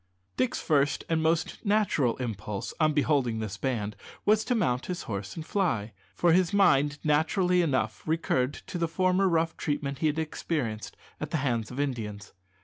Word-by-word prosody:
Dick's 130 0 0
first 145 -2 +1
and 165 -1 +2
most 160 +1 0
natural 200 - +2
impulse, 105 -5 -4
on 155 -1 +4
beholding 140 -5 +1
this 110 -2 -4
band, 110 -6 -2 0.3
was 215 +1 +4
to 250 - +1
mount 125 - 0
his 180 -1 -3
horse 100 -2 -5
and 160 - -6
fly, 115 - 0 0.2
for 170 - +4
his 180 -1 +3
mind 145 -8 +4
naturally 180 +4 +3
enough 130 -9 0
recurred 145 -4 +1
to 175 - -7
the 165 - +1
former 185 +3 +2
rough 165 -1 +1
treatment 140 -2 -2
he 160 - +2
had 150 +1 0
experienced 150 -8 -3 0.2
at 150 - -4
the 160 - 0
hands 115 -4 0
of 125 - -7
Indians. 110 -8 -3
145 Hz, 170 wpm, -28 LUFS, 120-170 Hz, 0.3 s, on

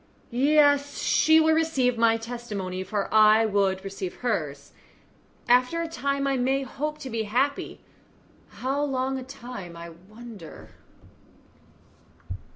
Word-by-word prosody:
Yes, 285 +2 +3
she 315 +1 +4
will 315 0 +4
receive 295 -6 +1
my 225 0 +3
testimony, 215 -6 -5
for 200 +2 -3
I 215 +1 +6
would 195 -2 0
receive 195 -2 -6
hers. 145 -11 -2 0.8
After 250 +7 +3
a 335 - -2
time 280 -2 -2
I 275 -1 +1
may 265 +2 0
hope 300 +3 -4
to 265 - -6
be 225 0 -2
happy. 275 +5 -1 0.7
How 270 +3 -3
long 265 -1 -1
a - - -7
time, 235 -9 -9
I 170 0 -9 0.2
wonder?" 215 -7 -12
245 Hz, 125 wpm, -25 LUFS, 205-275 Hz, 0.8 s, I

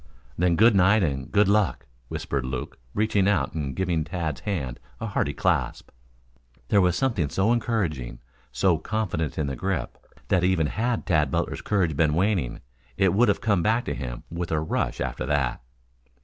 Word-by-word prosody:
"Then 90 0 +2
good 110 +4 +5
night 100 +2 +5
and 70 -4 -2
good 105 -1 +4
luck," 100 -8 +1 0.2
whispered 70 +1 -3
Luke, 65 -1 -5 0.2
reaching 105 -2 +2
out 105 - +1
and 70 -5 -3
giving 85 -4 0
Tad's 80 -3 -4
hand 75 - -3 0.2
a 115 - -4
hearty 95 -9 0
clasp. 85 - -1 0.8
There 100 - +5
was 90 -1 +3
something 105 - 0
so 100 +9 +2
encouraging 90 - -1 0.3
so 80 +5 +2
confident 85 -6 -2
in 75 - 0
the 70 -1 -3
grip, 95 +7 -3 0.3
that 90 -2 +3
even 90 -3 +2
had 115 +8 -1
Tad 75 -5 +2
Butler's - - -2
courage 90 -7 0
been 75 +1 +2
waning, 90 - 0 0.4
it 95 -3 +3
would 115 +5 +4
have 100 - +1
come 100 -5 +2
back 110 +6 +1
to - - -2
him - - -6
with 85 +1 -4
a 80 - +2
rush 80 - -2
after 65 - -3
that. 65 -4 0
90 Hz, 175 wpm, -25 LUFS, 75-105 Hz, 0.8 s, good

